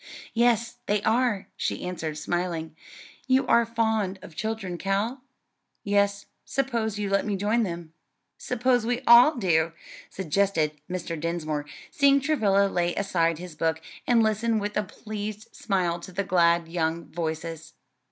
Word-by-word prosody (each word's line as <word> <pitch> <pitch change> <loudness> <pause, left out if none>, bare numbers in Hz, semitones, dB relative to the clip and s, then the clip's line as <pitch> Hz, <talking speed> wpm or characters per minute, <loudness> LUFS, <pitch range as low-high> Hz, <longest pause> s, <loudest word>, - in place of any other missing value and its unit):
"Yes, 235 0 +2
they 205 0 +1
are," 225 -3 +1
she - - -2
answered, 165 -4 -4
smiling. 165 -1 -2 0.5
"You 260 0 +3
are 235 -1 +4
fond 220 -4 0
of 160 - -12
children, 210 -4 -3
Cal?" 205 +7 -1 0.6
"Yes; 200 0 +1 0.2
suppose 235 -6 -1
you 205 -1 -2
let 195 0 +2
me 205 -2 -1
join 210 +5 +1
them." 170 -5 -4 0.5
"Suppose 250 0 +1
we 245 +2 -1
all 245 +6 +8
do," 165 -7 +1 0.4
suggested 185 -3 0 0.2
Mr. 175 -3 -4
Dinsmore, 155 -3 -2 0.2
seeing 280 0 +4
Travilla 220 -9 +2
lay 175 -2 0
aside 170 -5 +1
his 180 0 -8
book, 160 0 0 0.3
and 235 -2 +4
listen 220 +1 +1
with 205 0 -3
a - - +2
pleased 210 +1 -7
smile 180 -4 0
to 185 - -10
the 195 +3 -1
glad 170 -3 +3
young 165 0 -1
voices. 160 -1 -5
200 Hz, 140 wpm, -26 LUFS, 170-225 Hz, 0.6 s, all